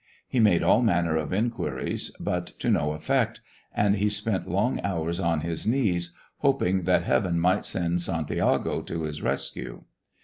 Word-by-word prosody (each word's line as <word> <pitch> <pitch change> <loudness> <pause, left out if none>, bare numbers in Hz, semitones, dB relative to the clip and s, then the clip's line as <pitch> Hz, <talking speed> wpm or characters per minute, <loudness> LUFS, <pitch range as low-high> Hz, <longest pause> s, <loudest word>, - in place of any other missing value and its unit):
He 130 - -1
made 100 -6 +4
all - - +4
manner 85 -8 +2
of 80 -2 -2
inquiries, 95 - -2
but 90 0 -2
to - - 0
no 75 +1 +1
effect, 75 0 0 0.3
and 105 0 +2
he 105 +2 +2
spent 105 -1 -1
long 100 +8 0
hours 85 -2 -2
on 85 -4 +1
his 85 +3 -3
knees, 90 -9 +1 0.2
hoping 95 - +1
that 90 0 +3
Heaven 85 +6 +1
might 90 +4 +2
send 85 -1 0
Santiago 85 -3 0
to 85 -1 -4
his 75 -1 -4
rescue. - - -3
90 Hz, 160 wpm, -26 LUFS, 85-105 Hz, 0.3 s, made